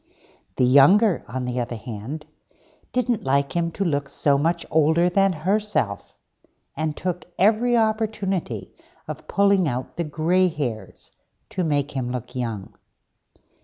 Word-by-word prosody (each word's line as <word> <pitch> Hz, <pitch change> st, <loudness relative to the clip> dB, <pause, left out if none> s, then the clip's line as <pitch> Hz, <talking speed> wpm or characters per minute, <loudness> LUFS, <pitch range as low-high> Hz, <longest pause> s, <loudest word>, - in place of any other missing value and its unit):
The 125 Hz, -, +3 dB
younger, 175 Hz, -, +5 dB
on 130 Hz, +1 st, -4 dB
the 125 Hz, 0 st, -2 dB
other 120 Hz, 0 st, -3 dB
hand, 120 Hz, +7 st, -7 dB, 0.7 s
didn't 245 Hz, -3 st, 0 dB
like 140 Hz, +3 st, +1 dB
him 170 Hz, -1 st, +1 dB
to 200 Hz, -, -2 dB
look 145 Hz, -4 st, -1 dB
so 140 Hz, 0 st, +2 dB
much 165 Hz, +4 st, 0 dB
older 160 Hz, +3 st, +3 dB
than 195 Hz, +1 st, +3 dB
herself, 170 Hz, -, -1 dB, 0.6 s
and 155 Hz, 0 st, -2 dB
took 180 Hz, -1 st, -3 dB
every 225 Hz, +5 st, +3 dB
opportunity 215 Hz, -4 st, -1 dB, 0.3 s
of -, -, -7 dB
pulling 200 Hz, -3 st, +3 dB
out 125 Hz, -1 st, -4 dB
the 170 Hz, -, 0 dB
grey 165 Hz, +4 st, +2 dB
hairs, 135 Hz, -10 st, -5 dB, 0.4 s
to 185 Hz, -, -1 dB
make 145 Hz, -3 st, 0 dB
him 125 Hz, -3 st, -3 dB
look 125 Hz, -1 st, -6 dB
young. 115 Hz, -6 st, -4 dB
155 Hz, 135 wpm, -23 LUFS, 130-195 Hz, 0.7 s, younger